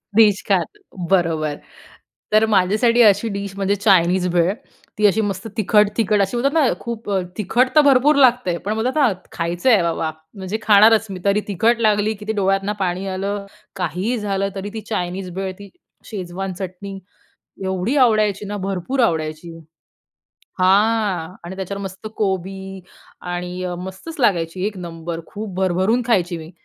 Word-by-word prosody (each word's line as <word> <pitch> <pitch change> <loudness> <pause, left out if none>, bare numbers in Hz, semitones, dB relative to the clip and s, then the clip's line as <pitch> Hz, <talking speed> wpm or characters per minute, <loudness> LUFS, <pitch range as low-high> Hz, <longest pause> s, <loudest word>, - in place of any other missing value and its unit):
Dish 210 -3 +5
खात 195 -3 +2 0.4
बरोबर. 160 -5 +1 0.8
तर 215 +1 +5
माझ्यासाठी 215 +4 +3
अशी 205 +2 +4
डिश 200 -1 -5
म्हणजे 200 0 +1
चायनीज 185 -3 +3
भेळ, 175 +2 +3 0.4
ती 210 - +2
अशी 210 +2 +2
मस्त 200 0 -3
तिखट-तिखट 210 0 +2
अशी 195 +5 -1
बोलतात 275 +4 +1
ना, 315 -4 +4
खूप 230 -3 -6
अ, 195 -1 +1 0.2
तिखट 230 +5 +2
तर 305 - +8
भरपूर 285 +1 +4
लागते. 245 -9 +3
पण 210 - 0
बोलतात 245 +5 -1
ना, 280 -7 +4 0.2
खायचं 170 +7 -1
आहे 215 -6 +5
बाबा, 165 -1 -1 0.3
म्हणजे 195 +2 -4
खाणारच 215 +1 +5
मी, 185 - -6
तरी 200 +1 +3
तिखट 225 +4 +2
लागली, 215 0 +2
कितीही 210 0 -12
ते 220 - 0
डोळ्यातनं 195 +1 +1
पाणी 185 0 -2
आलं, 200 +2 -3 0.3
काहीही 185 +6 -2
झालं 195 -1 -1
तरी, 195 +1 -5
ती 220 - -5
चायनीज 185 -2 -3
भेळ, 190 0 -3
ती 200 - -11 0.4
शेजवान 190 -2 -5
चटणी, 190 +2 -7 0.7
एवढी 190 +7 -1
आवडायची 215 -5 +3
ना, 205 +1 -4
भरपूर 195 +8 -3
आवडायची. 160 -2 -2 1.0
हां 195 -2 +2
आणि 185 +2 -7
त्याच्यावर 200 +1 -5
मस्त 195 +2 -8
कोबी 190 -1 -3 0.4
आणि 180 +1 -5
अ, 180 -1 -3
मस्तच 190 - -8
लागायची 185 -4 +1
1 210 -1 -4
नंबर, 165 -1 -6
खूप 210 -2 -7
भरभरून 190 +6 +1
खायची 185 -7 +1
मी. 160 0 -10
195 Hz, 155 wpm, -20 LUFS, 185-215 Hz, 1.0 s, तर